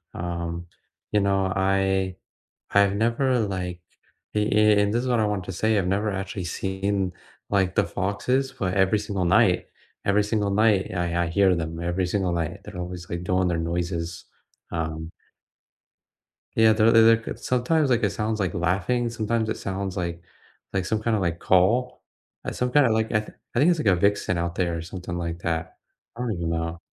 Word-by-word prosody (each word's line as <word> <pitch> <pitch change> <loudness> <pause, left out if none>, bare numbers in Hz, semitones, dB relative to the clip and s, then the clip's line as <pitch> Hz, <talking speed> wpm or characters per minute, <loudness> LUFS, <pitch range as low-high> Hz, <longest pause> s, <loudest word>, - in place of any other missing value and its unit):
um, 85 0 -4 0.5
you 105 - +3
know, 95 -1 +1
I 95 -1 +1 0.6
I've 100 -1 +4
never, 120 +4 +1
like- 90 -4 -3 0.5
an 105 - +2
an 105 -1 +5
and 105 +1 +2
this 120 - +2
is - - -2
what 120 -3 +2
I 105 - +2
wanted 100 -3 -2
to 95 - -5
say 110 +3 +1
I've 95 - 0
never 100 +3 0
actually 95 -1 -4
seen 95 +1 -2 0.4
like 95 -2 +1
the - - +4
foxes, 125 +8 -1
but 95 -8 -2
every 95 +2 +3
single 100 -3 -2
night, 95 +1 +3 0.4
every 100 +1 +3
single 105 -1 0
night, 105 -1 +3
I 85 -1 -1
I - - -2
hear 95 +1 +3
them 80 0 -4
every 85 +2 -1
single 95 -1 0
night. 85 0 -2
They're 105 -3 -9
always 90 0 -6
like 85 +1 -4
doing 90 0 +1
their 85 - 0
noises, 85 0 -3 0.5
um 80 -1 -4 1.5
Yeah, 110 0 +6
they're 110 +1 +4
they're 115 -1 +7
they're 115 0 +7
could 115 - -7
sometimes, 135 +4 +1
like, 120 -1 +3
it 105 - +2
sounds 110 +1 -2
like 95 -3 -1
laughing. 95 +8 0
Sometimes 115 0 -1
it - - -2
sounds 95 0 -4
like 85 -1 -3 0.5
like 95 -1 -1
some 110 +2 -1
kinda, 110 -2 +1
like, 85 -3 -1
call, 115 +8 +2 0.4
like, - - -3
some 125 0 -1
kinda, 135 -4 +5
like, 110 0 0
I 110 - +3 0.4
I 120 - +1
think 155 - +5
it's 170 - 0
like 110 - -1
a 95 - +5
vixen 100 -1 +1
out 85 0 -2
there 85 -2 0
or - - -4
something 90 +1 -6
like 85 0 -4
that. 80 -1 -3 0.4
I 120 - -6
don't 125 -2 -1
even 85 -4 -2
know. 85 0 -2
95 Hz, 190 wpm, -25 LUFS, 90-110 Hz, 1.5 s, they're